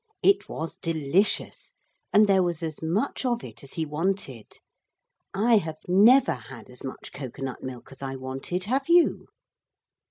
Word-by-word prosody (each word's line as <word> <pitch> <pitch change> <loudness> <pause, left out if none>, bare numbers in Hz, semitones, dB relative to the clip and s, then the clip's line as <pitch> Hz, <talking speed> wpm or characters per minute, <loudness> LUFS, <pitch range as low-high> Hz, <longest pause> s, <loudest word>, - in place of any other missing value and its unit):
It 395 - +4
was 160 +1 -5
delicious, 165 +5 0 0.4
and 210 +1 +6
there 195 -2 +4
was 175 -2 -1
as 160 -2 -4
much 190 - -1
of 240 -2 0
it - - -11
as 140 - -10
he 160 - -2
wanted. 150 - -3 0.8
I 220 +4 +4
have 160 -5 -2
never 225 +9 +6
had 120 -1 -11
as 125 - -7
much 135 - -7
cocoa 135 0 -7
nut 130 -2 -5
milk 130 -1 -8
as 135 - -12
I 135 -1 -4
wanted. 135 +7 -4
Have 270 - -1
you? 345 0 +4
165 Hz, 160 wpm, -26 LUFS, 135-205 Hz, 0.8 s, and